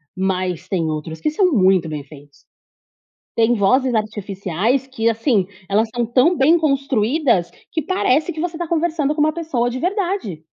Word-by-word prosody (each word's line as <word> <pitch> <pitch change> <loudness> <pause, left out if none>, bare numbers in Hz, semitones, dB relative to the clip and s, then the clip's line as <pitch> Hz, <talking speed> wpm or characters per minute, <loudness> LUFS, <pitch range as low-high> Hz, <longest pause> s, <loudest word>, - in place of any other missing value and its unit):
mas 185 -2 -2
tem 170 -4 0
outros 155 +1 -5
que 305 - 0
são 365 +4 +2
muito 185 - +3
bem 150 -2 -5
feitos. 145 0 -16 1.0
Tem 230 +1 +4
vozes 250 +5 +2
artificiais 210 +3 -1
que, 230 -4 -2
assim, 225 -3 +2 0.2
elas 215 +3 +2
são 240 - +1
tão 260 +9 +3
bem 315 +4 +4
construídas 275 - +1 0.2
que 320 - -2
parece 315 -2 +1
que 310 - -8
você 345 -1 -3
está 345 +1 -4
conversando 315 -3 0
com 300 - -1
uma 310 +1 +3
pessoa 305 -8 -1
de 245 - -4
verdade. 360 - -2
240 Hz, 165 wpm, -20 LUFS, 190-310 Hz, 1.0 s, Tem